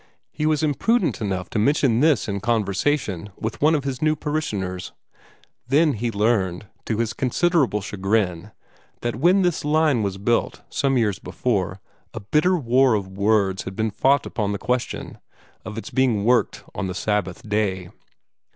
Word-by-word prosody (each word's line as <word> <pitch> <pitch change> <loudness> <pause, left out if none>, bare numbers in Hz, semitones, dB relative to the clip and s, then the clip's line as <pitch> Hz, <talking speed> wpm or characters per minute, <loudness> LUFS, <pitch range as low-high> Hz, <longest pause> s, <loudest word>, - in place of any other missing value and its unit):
He 155 0 -1
was 155 -1 +1
imprudent 175 - +1
enough 95 -3 -3
to 110 - 0
mention 130 -1 +3
this 150 -2 +3
in 100 -1 -2
conversation 105 - -1
with 110 0 -5
one 155 +2 +4
of 145 - -1
his 135 -2 -4
new 155 0 +2
parishioners. 105 -13 -3 0.7
Then 150 +3 +3
he 115 +2 -2
learned, 105 -3 0 0.2
to 110 - -1
his 115 -1 -1
considerable 135 - +1
chagrin, 95 -2 -1 0.5
that 120 -1 -2
when 180 +8 +4
this 175 -3 0
line 150 -4 +2
was 100 -2 -2
built, 115 +4 0
some 140 -2 +1
years 105 -5 +1
before, 100 -6 -2 0.4
a - - -3
bitter 155 - +2
war 130 -3 +3
of 100 -2 -3
words 100 -1 +1
had 95 - -6
been 110 +1 -1
fought 135 +6 +2
upon 105 -3 -2
the - - -2
question 125 +3 -3 0.4
of 105 - -7
its 115 - -6
being 120 -6 +1
worked 125 +1 +2
on 95 +1 -3
the 90 - -5
Sabbath 105 -1 -2
day. 100 -4 -1
115 Hz, 160 wpm, -23 LUFS, 100-140 Hz, 0.7 s, one